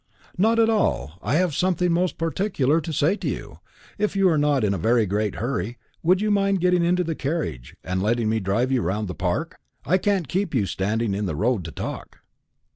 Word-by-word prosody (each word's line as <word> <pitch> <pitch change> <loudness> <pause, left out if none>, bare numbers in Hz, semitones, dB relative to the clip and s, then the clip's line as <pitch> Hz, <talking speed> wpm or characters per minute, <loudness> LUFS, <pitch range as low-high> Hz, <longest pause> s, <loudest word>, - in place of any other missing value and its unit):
"Not 220 +5 +3
at 225 -1 +5
all. 80 - 0
I 120 +8 0
have 175 -1 +2
something 180 +2 +1
most 180 +1 0
particular 165 -3 +1
to 160 - -5
say 155 +5 +2
to - - -3
you. - - -6 0.4
If 210 -1 0
you 195 -1 +4
are 160 - +2
not 145 -4 +2
in 100 -2 +2
a 95 - -3
very 115 +4 +3
great 105 +2 -1
hurry, 120 -1 -3 0.2
would 180 +3 +3
you 215 0 +1
mind 195 -1 +2
getting 180 0 +3
into 180 +1 +2
the 165 -1 -2
carriage, 140 - -4
and 90 +2 -2
letting 115 +2 +1
me 110 +1 +1
drive 110 +6 0
you 130 -2 +2
round 105 +4 -1
the 90 - -4
Park? - - -2 0.3
I 185 +7 +3
can't 195 -5 0
keep 185 0 -1
you 110 -6 +2
standing 105 +3 -1
in 100 0 -2
the 80 - -2
road 110 +2 0
to 80 - -6
talk." - - -7
140 Hz, 215 wpm, -24 LUFS, -, 0.4 s, at